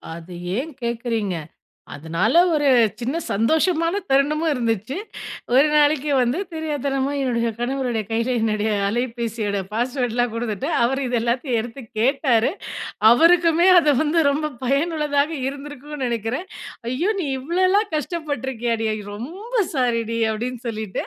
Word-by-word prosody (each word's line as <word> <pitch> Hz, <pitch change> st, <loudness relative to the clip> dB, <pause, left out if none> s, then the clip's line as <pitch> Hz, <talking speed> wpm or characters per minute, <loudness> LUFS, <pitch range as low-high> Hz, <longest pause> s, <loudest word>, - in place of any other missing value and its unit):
அது 170 Hz, +2 st, -10 dB, 0.2 s
ஏன் 310 Hz, +5 st, -3 dB
கேட்கிறீங்க. 230 Hz, -5 st, -2 dB, 0.6 s
அதனால 165 Hz, -, -1 dB, 0.2 s
ஒரு 290 Hz, -2 st, +2 dB, 0.3 s
சின்ன 255 Hz, +6 st, -2 dB, 0.2 s
சந்தோஷமான 330 Hz, -, +2 dB
தருணமும் 300 Hz, +4 st, +2 dB
இருந்துச்சு. 230 Hz, -, -1 dB, 0.6 s
ஒரு 280 Hz, +4 st, +6 dB
நாளைக்கு 295 Hz, -1 st, +3 dB
வந்து 250 Hz, +6 st, +1 dB
தெரியாத்தனமா 285 Hz, -3 st, -1 dB
என்னுடைய 235 Hz, -3 st, 0 dB
கணவருடைய 245 Hz, -3 st, -1 dB
கையில 230 Hz, +2 st, 0 dB
என்னுடைய 215 Hz, -1 st, 0 dB, 0.2 s
அலைபேசியோட 230 Hz, -3 st, -2 dB
பாஸ்வேர்ட்லாம் 245 Hz, 0 st, 0 dB
குடுத்துட்டு. 230 Hz, +3 st, -3 dB, 0.2 s
அவர் 270 Hz, +3 st, +1 dB
இத 245 Hz, -1 st, -1 dB
எல்லாத்தையும் 240 Hz, 0 st, 0 dB
எடுத்து 240 Hz, +4 st, -8 dB, 0.2 s
கேட்டாரு. 255 Hz, 0 st, +2 dB, 0.6 s
அவருக்குமே 335 Hz, +5 st, +5 dB
அது 300 Hz, -3 st, +3 dB
வந்து 320 Hz, +2 st, +2 dB
ரொம்ப 305 Hz, +2 st, -1 dB
பயனுள்ளதா 290 Hz, +1 st, +1 dB, 0.3 s
இருந்திருக்கும்னு 290 Hz, 0 st, -8 dB
நெனைக்கிறேன். 235 Hz, -, -2 dB, 0.4 s
"ஐயோ! 335 Hz, +11 st, +1 dB
நீ 335 Hz, -, -2 dB
இவ்வளோல்லா 370 Hz, +8 st, +2 dB
கஷ்டப்பட்டு 300 Hz, -5 st, -3 dB
இருக்கியாடி, 230 Hz, -2 st, -1 dB, 0.3 s
ரொம்ப 355 Hz, -, -8 dB, 0.2 s
சாரிடி" 230 Hz, -3 st, 0 dB
அப்படின்னு 240 Hz, +2 st, -4 dB
சொல்லிட்டு, 215 Hz, -4 st, -4 dB
255 Hz, 115 wpm, -22 LUFS, 230-300 Hz, 0.6 s, ஒரு